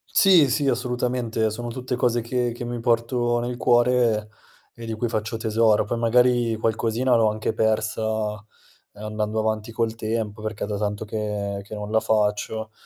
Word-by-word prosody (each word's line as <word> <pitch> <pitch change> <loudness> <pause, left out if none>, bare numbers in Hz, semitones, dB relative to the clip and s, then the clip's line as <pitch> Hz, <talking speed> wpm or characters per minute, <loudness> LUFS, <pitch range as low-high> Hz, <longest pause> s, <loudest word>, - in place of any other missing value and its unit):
Sì, 180 -8 +6
sì, 145 +3 0
assolutamente 125 -3 -1
sono 120 +3 -5
tutte 125 +1 -4
cose 120 -1 +1
che 120 +1 -1
che 120 +1 -7
mi 120 0 -4
porto 120 +1 +1
nel 120 +1 -3
cuore, 120 -3 +2 0.4
e 115 -1 -9
di 115 - -3
cui 110 +2 -2
faccio 110 0 -2
tesoro. 110 -1 +2
Poi 115 +2 -3
magari 120 0 +3
qualcosina 115 +3 +1
l'ho 115 -2 +4
anche 110 +1 -2
persa 110 -1 -1 0.5
andando 105 +1 -3
avanti 110 0 -1
col 115 0 -1
tempo, 110 -1 -3
perché 110 -1 -4
è - - -3
da 105 -1 -3
tanto 105 0 -2
che 105 -2 -3
che 105 - -9
non 105 0 -6
la 110 0 +3
faccio, 110 +1 -1
110 Hz, 170 wpm, -24 LUFS, 110-120 Hz, 0.5 s, Sì